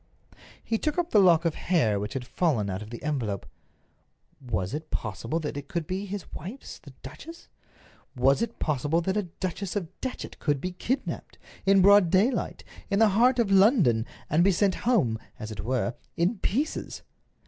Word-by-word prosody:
He 225 -1 -1
took 305 +1 -1
up 350 -1 0
the 210 - +6
lock 170 -3 +5
of 165 - +2
hair 130 - +1
which 105 +1 -4
had 130 -2 -3
fallen 125 - 0
out 95 +3 -4
of 105 - -8
the 120 - -8
envelope. 120 -11 -2 1.0
Was 95 -6 -2
it 155 +1 -5
possible 115 - -3
that 150 - -4
it 145 -1 -6
could 170 -2 -3
be 190 +4 -4
his 200 -1 -5
wife's, 200 - -8
the 145 - -14
duchess? 220 - -11 0.7
Was 135 - +3
it 230 0 -2
possible 150 +3 0
that 190 +3 -1
a 210 - +2 0.2
Duchess 185 +1 -3
of 185 -6 -2
Datchet 260 - -5
could 145 -3 0
be 180 +6 -3
kidnaped, 240 +9 -3 0.3
in 195 -1 +6
broad 200 -2 +7
daylight, 205 +9 +1 0.3
in 200 - +1
the 220 0 +5
heart 240 +6 +4
of 230 -5 +1
London, 190 - +4 0.2
and 160 +4 +3
be 195 - +5
sent 195 +1 +2 0.2
home, 125 - +2 0.2
as 110 0 -7
it 100 -2 -6
were, 125 0 0 0.2
in 185 +6 +1
pieces? 280 +14 -2
170 Hz, 180 wpm, -27 LUFS, 130-205 Hz, 1.0 s, broad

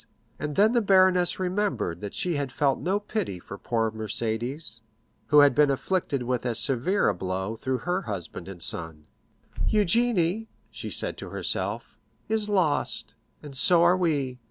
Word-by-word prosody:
And 150 -1 -4
then 215 +2 +4
the 240 - +3
baroness 185 -3 +3
remembered 185 - -2
that 105 -1 -6
she 175 -2 -1
had 140 -3 -3
felt 140 -1 0
no 190 +4 0
pity 205 - -4
for 95 +3 -10
poor 115 -2 -1
Mercédès, 110 +3 -3 0.5
who 150 -1 +6
had 145 -1 +5
been 150 -1 +4
afflicted 140 -1 -1
with 125 0 -2
as 120 -3 0
severe 140 - +3
a 105 - +2
blow 95 +3 -4
through 130 +3 -2
her 180 0 0
husband 95 -4 -7
and 90 -4 -7
son. 80 -2 -3 0.6
"Eugénie," 215 -1 +1 0.2
she - - -7
said - - -1
to - - -8
herself, - - -2 0.3
"is 215 -1 -1
lost, 150 - 0 0.3
and 145 -2 -9
so 170 +6 +7
are 175 +1 +5
we. 145 -8 -1
145 Hz, 160 wpm, -26 LUFS, 110-185 Hz, 0.6 s, so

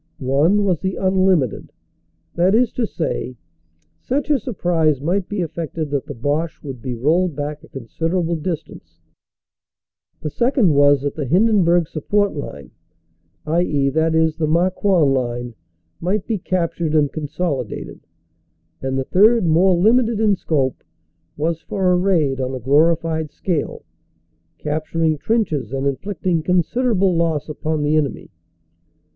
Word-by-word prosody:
One 145 +10 +2
was 185 -5 +1
the 190 0 -2
unlimited; 185 - +1 0.6
that 180 +4 +3
is 240 0 +3
to 235 -3 -1
say, 150 -8 -3 0.6
such 285 +3 -2
a 285 - +3
surprise 170 - 0
might 180 +6 -1
be 205 -3 -2
effected 160 -2 -4
that 140 -2 -2
the - - -6
Boche 145 +7 -2
would 135 -5 -7
be 125 -1 -4
rolled 160 +7 +1
back 145 0 -5
a - - -14
considerable 165 +7 -2
distance. 150 - -6 1.2
The 150 - -5
second 240 - +2
was 145 -1 +4
that 145 - -1
the 150 -4 -4
Hindenburg 175 - +3
Support 205 +7 0
line 70 - -7 0.7
(i.e., 155 -4 +1
the 160 +2 +1 0.4
Marcoing 175 -2 +2
line) 120 -2 -2 0.5
might 190 +3 -1
be 220 -4 -2
captured 170 -3 -1
and 145 -2 +2
consolidated. 145 - -4 0.8
And 135 0 -2
the 135 - 0
third, 215 - +4
more 175 +3 +4
limited 225 +3 +3
in 215 -2 +3
scope, 140 -7 -1 0.5
was 160 +2 -1
for 190 -2 0
a - - +4
raid 165 -8 +1
on 130 0 -2
a - - -5
glori 150 +7 +4
fied 160 -2 -3
scale, 165 -1 -3 0.7
capturing 155 +1 -1
trenches 160 - -1
and 135 0 -2
inflicting 175 +4 -1
considerable 185 +3 +1
loss 165 -3 0
upon 155 0 -2
the 150 +1 +2
enemy. 150 -3 -2
165 Hz, 135 wpm, -20 LUFS, 145-185 Hz, 1.2 s, was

